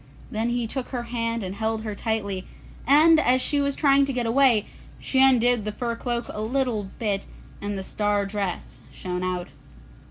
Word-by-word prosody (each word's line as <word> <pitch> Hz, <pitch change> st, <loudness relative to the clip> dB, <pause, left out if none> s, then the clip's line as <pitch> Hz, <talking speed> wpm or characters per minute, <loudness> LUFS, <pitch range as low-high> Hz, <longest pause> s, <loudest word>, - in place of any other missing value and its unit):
Then 220 Hz, +2 st, -1 dB
he 240 Hz, 0 st, -1 dB
took 250 Hz, +3 st, -4 dB
her 245 Hz, -2 st, -4 dB
hand 230 Hz, -1 st, -2 dB
and 185 Hz, 0 st, -4 dB
held 220 Hz, +1 st, -2 dB
her 215 Hz, -2 st, -4 dB
tightly, 200 Hz, -3 st, -3 dB, 0.4 s
and 310 Hz, +4 st, +6 dB
as 255 Hz, -3 st, +3 dB
she 285 Hz, +2 st, +1 dB
was 280 Hz, -1 st, 0 dB
trying 280 Hz, -2 st, +4 dB
to 275 Hz, -, -3 dB
get 250 Hz, -2 st, -1 dB
away, 235 Hz, -2 st, +4 dB, 0.3 s
she 265 Hz, -, +1 dB
undid 245 Hz, -3 st, +4 dB
the 210 Hz, -, -3 dB
fur 235 Hz, +2 st, -3 dB
cloak 235 Hz, 0 st, -3 dB
a 210 Hz, -, -5 dB
little 225 Hz, -3 st, -1 dB
bit 205 Hz, -4 st, -2 dB, 0.3 s
and 205 Hz, 0 st, -3 dB
the 190 Hz, -, -4 dB
star 205 Hz, 0 st, 0 dB
dress 195 Hz, -2 st, -4 dB
shone 180 Hz, -1 st, -5 dB
out. 180 Hz, -1 st, -3 dB
230 Hz, 185 wpm, -24 LUFS, 205-255 Hz, 0.4 s, and